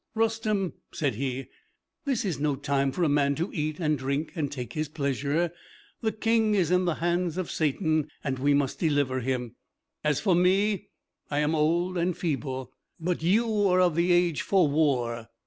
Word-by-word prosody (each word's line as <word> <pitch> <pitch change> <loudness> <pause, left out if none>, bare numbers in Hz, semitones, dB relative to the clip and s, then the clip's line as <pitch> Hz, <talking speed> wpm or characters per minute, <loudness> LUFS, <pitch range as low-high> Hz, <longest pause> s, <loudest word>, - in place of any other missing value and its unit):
"Rustem," 220 -4 0 0.2
said 145 -4 -1
he, 130 +3 -3 0.6
"this 265 -6 0
is 170 -9 -2
no 145 -1 +1
time 140 0 0
for 175 +7 -1
a - - +4
man 140 -1 +2
to 170 +5 -2
eat 155 0 -2
and 155 -4 +1
drink 140 +4 -2
and 150 -5 -2
take 125 -5 -6
his 155 -1 -2
pleasure. 145 +3 -1 0.5
The 220 - +1
King 220 -1 +2
is 180 -4 +2
in 180 0 +3
the 170 -3 +1
hands 175 0 0
of 185 -3 -3
Satan, 155 0 0
and 130 -3 -2
we 140 +2 +3
must 140 -2 0
deliver 145 -5 +1
him. 125 -1 -3 0.5
As 150 -2 +2
for 195 -4 +2
me, 190 +3 +2 0.4
I 145 - -2
am 150 +1 +2
old 170 +4 +1
and 175 0 0
feeble; 135 -5 -3 0.3
but 175 +1 -1
you 210 +3 +2
are 185 -1 +3
of 180 -2 +4
the 170 +3 +2
age 175 -3 +3
for 190 -5 +3
war. 125 -6 0
155 Hz, 180 wpm, -27 LUFS, 140-180 Hz, 0.6 s, a